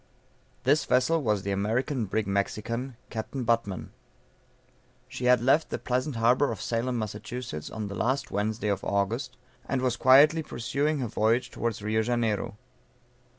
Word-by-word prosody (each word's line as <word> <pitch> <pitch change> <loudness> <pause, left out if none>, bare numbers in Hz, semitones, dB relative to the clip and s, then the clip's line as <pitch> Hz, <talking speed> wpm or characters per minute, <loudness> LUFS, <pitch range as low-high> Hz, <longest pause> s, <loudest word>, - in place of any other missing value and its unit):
This 145 +4 +3
vessel 140 +6 +2
was 105 -6 0
the 100 - -2
American 115 +6 0
brig 110 +2 -1
Mexican, 115 +5 -2
Capt. 120 +3 -4
Butman. 115 -5 -1 1.2
She 125 - -5
had 125 -1 +5
left 135 +6 +3
the - - -2
pleasant 130 +2 -1
harbor 120 +4 +3
of 110 - -5
Salem, 120 +2 -1
Mass., 110 -2 -3 0.5
on 110 -2 -5
the 100 - -6
last 130 +8 -1
Wednesday 105 +1 -1
of 100 -1 -1
August, 115 +7 -1 0.3
and 135 - +1
was 125 -2 +1
quietly 145 +5 +6
pursuing 145 +2 -1
her 125 - -1
voyage 115 +4 +1
towards 115 -3 -3
Rio 110 +1 +1
Janeiro. 110 -3 -1
115 Hz, 150 wpm, -27 LUFS, 105-130 Hz, 1.2 s, quietly